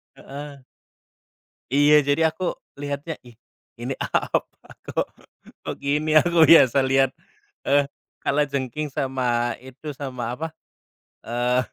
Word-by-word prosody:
Heeh. 140 0 -9 1.1
Iya, 145 +2 +5
jadi 145 +3 +3
aku 165 +4 -5 0.4
lihatnya, 145 +3 -4
ih, 120 -2 -16 0.4
ini, 125 +3 -3
apa, - - +1 0.5
kok - - -1 0.6
kok - - -4
gini 150 +2 0
aku 170 0 +3
biasa 140 -5 +7
lihat, 135 0 +3 0.6
eee, 140 0 +4 0.4
kalajengking 140 0 -1
sama 120 -3 0
itu, 135 +3 -8
sama, 125 -4 -4
apa, 160 +5 -4 0.8
eee, 120 +2 +1
140 Hz, 105 wpm, -24 LUFS, 125-150 Hz, 1.1 s, biasa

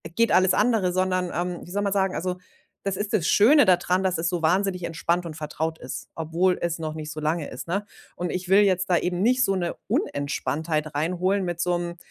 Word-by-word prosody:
geht 230 -1 +3
alles 185 0 +4
andere, 215 -7 +2
sondern, 185 -1 0
ähm, 175 +1 -3
wie 175 - -12
soll 205 +1 -1
man 200 -1 0
sagen? 190 -1 +1
Also, 180 +1 -2 0.5
das 195 -1 -1
ist 205 +1 -3
das 195 -8 +1
Schöne 285 +8 +6
dadran, 180 +1 +2
dass 185 -3 +1
es 165 +1 0
so 175 -2 -2
wahnsinnig 180 +2 +1
entspannt 170 +1 -1
und 160 -2 -6
vertraut 160 +1 -3
ist, - - -7
obwohl 170 +3 +1
es 170 -1 -2
noch 155 -1 -4
nicht 155 -1 -6
so 155 - -6
lange 155 0 -1
ist, 130 - -8
ne? 200 +4 -2 0.3
Und 175 -1 -3
ich 180 0 -4
will 195 +2 +6
jetzt 190 -2 +2
da 180 - +4
eben 180 0 -1
nicht 255 +3 +3
so 195 - +1
'ne 175 -2 -2
Unentspanntheit 150 +2 -2
reinholen 180 +5 0
mit 175 -1 -3
so 175 0 +1
'nem 175 0 -5
180 Hz, 225 wpm, -25 LUFS, 165-190 Hz, 0.5 s, Schöne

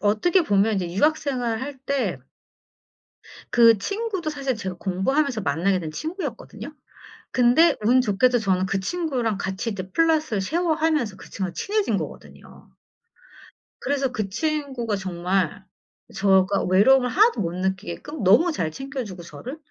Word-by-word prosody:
어떻게 220 - +2
보면 205 -2 +2
이제 180 -3 -2
유학 305 - +3
생활할 260 -1 -3
때 255 - -2 1.3
그 230 -2 +6
친구도 400 - -3
사실 275 -4 -2
제가 190 -5 -5
공부하면서 225 - 0
만나게 180 +4 +1
된 160 -3 -6
친구였거든요. 290 - -6 0.6
근데 260 +6 +4
운 255 +3 +5
좋게도 245 +3 +2
저는 190 -3 +1
그 195 0 -1
친구랑 250 - -2
같이 190 +4 -3
이제 185 -2 -6
flat을 315 -10 +2
쉐어하면서 315 - 0
그 - - -13
친구랑 190 -3 -4
친해진 420 0 0
거거든요. - - -10 1.1
그래서 275 -2 -1
그 215 -5 -3
친구가 265 -2 -2
정말 185 0 -2 0.5
제가 195 0 +3
외로움을 250 +7 +5
하나도 440 - +3
못 170 -2 -2
느끼게끔 190 +9 -4
너무 240 - +5
잘 160 - -2
챙겨 270 - -5
주고 185 -5 -9
저를. 235 - -8
230 Hz, 320 characters per minute, -23 LUFS, 190-295 Hz, 1.3 s, 그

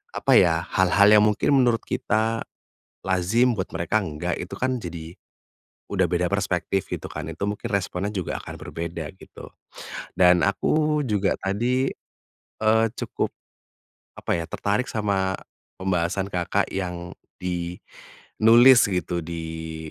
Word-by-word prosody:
apa - - +2
ya? - - +3
Hal-hal 95 +3 +4
yang 105 - +6
mungkin 105 +5 +1
menurut 120 -3 +3
kita, 110 +2 0 0.6
lazim 95 +7 +2
buat 95 - -2
mereka 85 +6 +1
enggak 85 +1 -3
itu 90 - -7
kan 130 0 0
jadi, 85 -1 -7 0.8
udah - - +2
beda - - +1
perspektif 95 -2 -1
gitu - - -4
kan - - -6
itu 80 - -9
mungkin 105 +3 -4
responnya 95 0 -1
juga 95 -4 -3
akan - - -8
berbeda 85 -1 -5
gitu, - - -12 0.7
dan 90 -1 +6
aku 150 +9 +1
juga 100 -2 +1
tadi, 120 +7 0 0.7
eee, 110 +1 +4
cukup. - - -2 0.9
Apa - - -1
ya? 85 - -3
Tertarik 105 +5 -1
sama, 100 -3 0 0.4
pembahasan 95 +1 -1
Kakak 90 -1 0
yang 90 -2 -4 0.3
di 90 -1 -3 0.6
nulis 120 +2 +7
gitu 90 -2 -2
di 80 -1 -6
95 Hz, 130 wpm, -24 LUFS, 85-110 Hz, 0.9 s, nulis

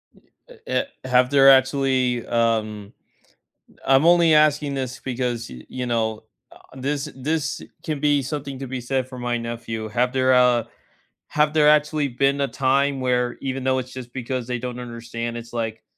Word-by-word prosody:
N - - -23 0.3
uh, - - -13
eh - - +1 0.2
have 125 0 +3
there 135 -1 +6
actually, 130 -2 +3
um, 110 -3 -1 0.9
I'm 135 +3 +4
only 170 -2 +5
asking 150 -1 +3
this 130 -1 -4
because, 125 -2 -3
y 60 0 -10
you 125 -1 -4
know, 110 -2 -1 0.3
uh, - - -15 0.2
this 140 +3 -3
this 145 +2 -2 0.2
can 155 -3 -3
be 145 -1 +2
something 140 0 -5
to 135 - -5
be 130 -1 -5
said 130 +1 -1
for 130 -1 -9
my 120 0 -1
nephew. 115 -1 -5
Have 125 +3 0
there, 130 0 +3
uh 125 -2 +4 0.6
have 150 0 +1
there 150 -1 +5
actually 150 -1 +2
been 140 +3 +1
a 140 - +1
time 135 +1 +1
where 125 -1 0
even 135 -1 -3
though 130 0 +1
it's 130 0 -7
just 125 -2 -9
because 125 -1 -4
they 125 - -2
don't 125 0 -5
understand, 115 -1 -6
it's 115 0 -10
like, 115 -1 -4
130 Hz, 175 wpm, -23 LUFS, 120-140 Hz, 0.9 s, there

